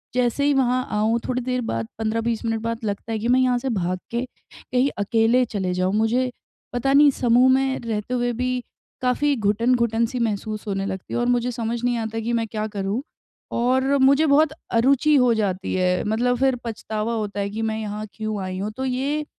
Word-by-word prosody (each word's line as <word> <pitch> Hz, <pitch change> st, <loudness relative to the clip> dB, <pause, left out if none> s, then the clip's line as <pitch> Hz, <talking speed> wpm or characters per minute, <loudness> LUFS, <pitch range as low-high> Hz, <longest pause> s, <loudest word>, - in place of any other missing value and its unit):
जैसे 250 Hz, +3 st, +1 dB
ही 290 Hz, -, +4 dB
वहाँ 255 Hz, -1 st, +2 dB
आऊँ 215 Hz, +2 st, +1 dB
थोड़ी 255 Hz, 0 st, -1 dB
देर 250 Hz, 0 st, -1 dB
बाद, 115 Hz, -1 st, -2 dB
15-20 225 Hz, +1 st, -1 dB
मिनट 225 Hz, -1 st, 0 dB
बाद 230 Hz, 0 st, -3 dB
लगता 205 Hz, +2 st, -4 dB
है 220 Hz, -, -1 dB
कि 225 Hz, -, -2 dB
मैं 250 Hz, +1 st, +4 dB
यहाँ 250 Hz, -1 st, +3 dB
से 265 Hz, -, -3 dB
भाग 185 Hz, -5 st, -1 dB
के 235 Hz, +1 st, -1 dB
कहीं 255 Hz, +1 st, -3 dB
अकेले 225 Hz, +4 st, +3 dB
चले 190 Hz, -5 st, -2 dB
जाऊँ, 185 Hz, +2 st, 0 dB
मुझे 240 Hz, +4 st, +2 dB, 0.4 s
पता 260 Hz, +3 st, 0 dB
नहीं 290 Hz, +1 st, +7 dB
समूह 250 Hz, 0 st, +4 dB
में 265 Hz, 0 st, +1 dB
रहते 220 Hz, +2 st, -3 dB
हुए 245 Hz, -1 st, +1 dB
भी 250 Hz, +1 st, -2 dB, 0.4 s
काफ़ी 275 Hz, +3 st, +2 dB
घुटन 225 Hz, +3 st, +1 dB
घुटन-सी 235 Hz, +1 st, 0 dB
महसूस 215 Hz, -1 st, -2 dB
होने 195 Hz, -1 st, -1 dB
लगती 190 Hz, -1 st, -5 dB
है -, -, 0 dB
और 240 Hz, -, +1 dB
मुझे 245 Hz, 0 st, +1 dB
समझ 230 Hz, 0 st, -3 dB
नहीं 245 Hz, -1 st, +1 dB
आता 225 Hz, 0 st, -3 dB
कि 230 Hz, +2 st, -2 dB
मैं 230 Hz, -1 st, 0 dB
क्या 215 Hz, 0 st, -3 dB
करूँ 200 Hz, +5 st, -1 dB, 0.5 s
और 260 Hz, +2 st, +1 dB
मुझे 275 Hz, +3 st, +5 dB
बहुत 305 Hz, +1 st, +4 dB, 0.2 s
अरूचि 275 Hz, +5 st, +3 dB
हो 250 Hz, -3 st, +4 dB
जाती 195 Hz, -4 st, -1 dB
है, 180 Hz, 0 st, +1 dB
मतलब 240 Hz, +3 st, +1 dB
फिर 265 Hz, -1 st, +3 dB
पछतावा 220 Hz, 0 st, -3 dB
होता 210 Hz, -2 st, -3 dB
है 200 Hz, 0 st, -1 dB
कि 215 Hz, +2 st, -4 dB
मैं 220 Hz, 0 st, -1 dB
यहाँ 210 Hz, 0 st, -4 dB
क्यों 215 Hz, -2 st, -3 dB
आई 185 Hz, 0 st, -4 dB
हूँ 210 Hz, +2 st, -3 dB
तो 265 Hz, -, -2 dB
ये, 275 Hz, +4 st, -1 dB
230 Hz, 205 wpm, -23 LUFS, 215-255 Hz, 0.5 s, नहीं